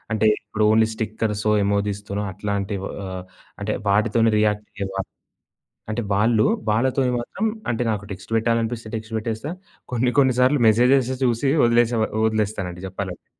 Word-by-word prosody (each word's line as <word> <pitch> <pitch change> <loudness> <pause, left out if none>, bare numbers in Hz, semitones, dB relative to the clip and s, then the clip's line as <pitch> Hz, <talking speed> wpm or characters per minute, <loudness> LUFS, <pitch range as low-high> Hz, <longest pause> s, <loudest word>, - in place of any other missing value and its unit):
అంటే 110 0 +2
ఇప్పుడు 105 +1 -2
only 110 +1 +5
స్టిక్కర్సొ, 110 -1 -1
emojis 100 0 0
తోనో 100 +1 -2
అట్లాంటి 100 +1 -3 0.3
ఆహ్, 95 -1 -5 0.4
అంటే 105 +1 -2 0.2
వాటితోనే 110 +3 +3
రియాక్టయ్యేవారు. 105 -2 -2 0.9
అంటే 115 +2 -1
వాళ్ళు, 110 +2 +3 0.3
వాళ్ళతోని 130 +3 +1
మాత్రం 195 - -4 0.3
అంటే 115 +1 -1
నాకు 105 -2 -3
టెక్స్ట్ 95 +3 -9
బెట్టాలనిపిస్తే 115 0 -1
టెక్స్ట్ 110 0 -7
పెట్టేస్తా. 110 +6 -4 0.4
కొన్ని 125 +1 +1
కొన్ని 130 -3 +4
సార్లు 130 +1 +3
మెసేజెస్ 125 +3 +4
చూసి 125 +3 +1
వదిలేస 120 0 +3 0.3
వదిలేస్తానండి 100 -5 -2
జెప్పాలంటే. 95 -1 -6
110 Hz, 130 wpm, -22 LUFS, 100-120 Hz, 0.9 s, only